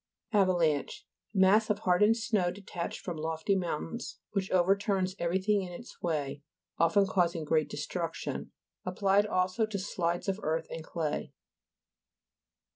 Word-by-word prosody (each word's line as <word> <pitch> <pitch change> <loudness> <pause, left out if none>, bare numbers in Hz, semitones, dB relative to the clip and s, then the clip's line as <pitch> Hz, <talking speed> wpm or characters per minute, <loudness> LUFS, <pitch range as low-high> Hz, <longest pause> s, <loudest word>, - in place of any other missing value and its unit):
AVALA'NCHE 175 -7 +2 0.3
Mass 200 +3 +5
of 210 - +2
hardened 210 +5 +4
snow, 215 -6 +1
detached 180 -2 -5
from 175 -3 -5
lofty 160 +5 0
moun 175 -5 -1 0.2
tains, - - -7 0.2
which 195 -2 -1
overturns 190 +1 +2
everything 190 +4 +1
in 180 -2 -6
its 205 +7 -11
way, 145 -4 -2 0.4
often 170 +4 +4
causing 175 -3 +1
great 155 0 +1
de - - -6
struction. - - -4 0.3
Applied 195 +2 +2
also 185 +2 +1
to 215 -2 -3
slides 175 -3 -2
of 195 +1 0
earth 160 +1 -1
and 165 - -5
clay. 160 -2 -3
185 Hz, 135 wpm, -30 LUFS, 170-200 Hz, 0.4 s, Mass